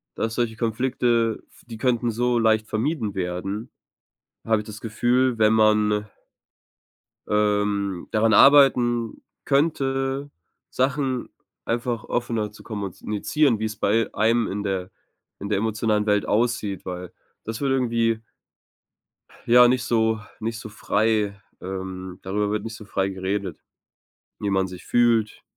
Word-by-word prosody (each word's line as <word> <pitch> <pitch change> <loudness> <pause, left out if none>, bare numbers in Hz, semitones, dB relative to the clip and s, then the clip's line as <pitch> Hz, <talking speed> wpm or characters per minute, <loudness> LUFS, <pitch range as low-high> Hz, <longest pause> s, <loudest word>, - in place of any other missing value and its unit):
dass 115 0 -2
solche 120 -2 -1
Konflikte, 115 0 0 0.2
die 115 -2 -9
könnten 120 -1 +1
so 120 +2 +1
leicht 110 -1 +2
vermieden 110 -2 -2
werden, 95 +5 -4 0.7
habe 110 -1 +2
ich 105 - -10
das 110 -1 -9
Gefühl, 120 +3 +1
wenn 110 0 +4
man 105 -1 +3 1.2
ähm, 105 -3 0
daran 110 +1 +3
arbeiten 120 -3 +5 0.2
könnte, 135 -1 0 0.4
Sachen 130 -1 -1 0.4
einfach 120 -1 -2
offener 115 -3 -2
zu 105 - -15
kommunizieren, 105 - -1
wie 110 - -1
es 110 0 -4
bei 110 +2 +1
einem 115 +2 +2
in 100 +1 -3
der 95 -2 -2 0.5
in 100 - -4
der 105 - +1
emotionalen 110 -1 0
Welt 105 -1 +2
aussieht, 105 -4 0
weil 90 -1 -6 0.3
das 115 +3 -5
würde 135 -1 +2
irgendwie 115 -3 +1 1.3
ja, 125 +1 +7
nicht 125 0 +1
so 110 -2 +1 0.2
nicht 115 +1 -3
so 115 - -8
frei 105 -1 0 0.2
ähm, 95 -1 -6
darüber 105 +2 -1
wird 105 - -2
nicht 115 -1 -6
so 110 - -11
frei 95 -1 -1
geredet, 95 +1 -3 0.8
wie 100 - -2
man 95 -1 +1
sich 90 -1 -10
fühlt 115 -3 +2
110 Hz, 130 wpm, -24 LUFS, 105-120 Hz, 1.3 s, ja